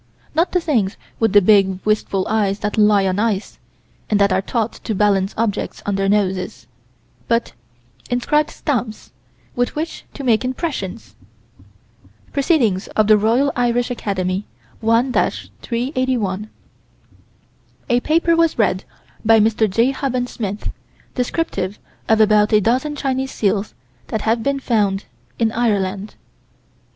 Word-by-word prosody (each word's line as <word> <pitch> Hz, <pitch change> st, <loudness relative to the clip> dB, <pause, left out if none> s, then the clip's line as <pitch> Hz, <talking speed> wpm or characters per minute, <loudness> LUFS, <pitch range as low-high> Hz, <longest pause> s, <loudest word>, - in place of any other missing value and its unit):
Not 330 Hz, +4 st, +1 dB
the 360 Hz, -, +2 dB
things 235 Hz, -, 0 dB, 0.2 s
with 225 Hz, -2 st, +2 dB
the 205 Hz, -1 st, +6 dB
big, 195 Hz, -2 st, +4 dB
wistful 210 Hz, -3 st, 0 dB
eyes 205 Hz, -3 st, +1 dB
that 210 Hz, -1 st, -2 dB
lie 210 Hz, -2 st, +4 dB
on 190 Hz, +1 st, 0 dB
ice, 215 Hz, -2 st, -1 dB, 0.5 s
and 210 Hz, -, +2 dB
that 200 Hz, -1 st, +3 dB
are 190 Hz, -, +2 dB
taught 225 Hz, +2 st, -2 dB
to 220 Hz, -, -2 dB
balance 195 Hz, -1 st, +2 dB
objects 215 Hz, -2 st, -2 dB
on 205 Hz, -, -1 dB
their 195 Hz, 0 st, 0 dB
noses 190 Hz, -3 st, -1 dB, 0.6 s
but 230 Hz, 0 st, 0 dB, 0.6 s
inscribed 295 Hz, +5 st, +1 dB
stamps, 235 Hz, -6 st, -3 dB, 0.4 s
with 245 Hz, 0 st, -1 dB
which 320 Hz, +2 st, -4 dB
to 280 Hz, -, -6 dB
make 235 Hz, -3 st, +2 dB
impressions. 255 Hz, -, -4 dB, 1.2 s
Proc. 280 Hz, -, -1 dB
Roy. 220 Hz, -, +3 dB
Irish 245 Hz, 0 st, +1 dB
Acad., 205 Hz, -5 st, -3 dB, 0.6 s
1 230 Hz, +3 st, +2 dB
381: 235 Hz, -7 st, -2 dB, 1.4 s
A 240 Hz, -, +4 dB
paper 330 Hz, +5 st, +2 dB
was 330 Hz, -1 st, +2 dB
read 195 Hz, -4 st, +1 dB, 0.4 s
by 225 Hz, 0 st, +5 dB
Mr. 220 Hz, 0 st, +2 dB
J. 230 Hz, +7 st, +2 dB
Huband 255 Hz, -2 st, -1 dB
Smith, 205 Hz, -2 st, -4 dB, 0.4 s
descriptive 240 Hz, -, -2 dB, 0.3 s
of 220 Hz, 0 st, +4 dB
about 210 Hz, -1 st, +4 dB
a 215 Hz, -, +5 dB
dozen 255 Hz, +8 st, 0 dB
Chinese 265 Hz, -2 st, -1 dB
seals 205 Hz, -2 st, -1 dB, 0.3 s
that 220 Hz, -, -2 dB
had 225 Hz, +1 st, +1 dB
been 280 Hz, +4 st, 0 dB
found 205 Hz, -6 st, 0 dB, 0.3 s
in 225 Hz, -1 st, +1 dB
Ireland. 205 Hz, -3 st, -1 dB
220 Hz, 130 wpm, -19 LUFS, 205-250 Hz, 1.4 s, the